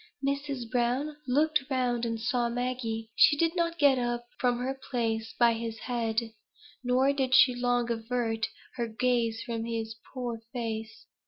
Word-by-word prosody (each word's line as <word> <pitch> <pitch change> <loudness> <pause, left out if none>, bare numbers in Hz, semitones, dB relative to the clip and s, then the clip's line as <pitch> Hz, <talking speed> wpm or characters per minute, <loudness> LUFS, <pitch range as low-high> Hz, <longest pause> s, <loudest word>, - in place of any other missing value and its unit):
Mrs. 280 -3 -2
Browne 255 +5 0
looked 300 +4 +3
round, 245 -3 0
and 230 0 -2
saw 240 0 0
Maggie. 235 -2 -2
She 290 - +6
did 330 +2 +2
not 335 -1 0
get 280 -4 +5
up 240 0 -2
from 245 -1 +2
her 255 +2 -2 0.2
place 225 -3 -1
by 235 -1 +5
his 225 0 -4
head; 230 -1 -1 0.6
nor 255 +3 +3
did 260 -2 +2
she 255 - +7
long 245 -1 +1
avert 225 -1 -1 0.3
her 235 -1 -1
gaze 230 0 0
from 230 -2 -3
his 225 -1 -3 0.2
poor 240 -3 -4
face. 225 -2 -4
245 Hz, 155 wpm, -29 LUFS, 230-255 Hz, 0.6 s, she